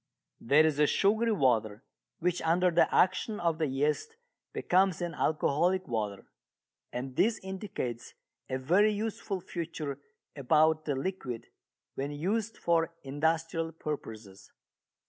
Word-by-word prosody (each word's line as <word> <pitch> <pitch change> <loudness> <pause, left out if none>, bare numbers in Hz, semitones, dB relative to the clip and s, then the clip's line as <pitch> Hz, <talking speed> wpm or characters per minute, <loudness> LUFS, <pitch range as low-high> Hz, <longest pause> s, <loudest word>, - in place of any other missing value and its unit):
There 145 +6 +5
is 150 -2 +1
a 150 - +5
sugary 220 +7 +2
water 115 - +1 0.3
which 180 +1 0
under 175 +2 +3
the 170 - +3
action 195 +3 +2
of 170 -2 0
the 155 - +1
yeast 150 - -1 0.4
becomes 185 -1 +2
an 175 -1 -3
alcoholic 170 +5 +1
water. 105 -5 -3 0.7
And 125 +1 -5
this 215 - +2
indicates 190 - -5 0.3
a 130 - -1
very 180 +11 +3
useful 210 -2 -3
feature 160 -5 -5 0.4
about 155 +3 +3
the 145 - 0
liquid 135 -6 -4 0.5
when 140 +1 -3
used 200 +10 -2
for 165 -1 +1
industrial 160 +3 -1
purposes. 110 -11 -7
160 Hz, 125 wpm, -30 LUFS, 135-185 Hz, 0.7 s, There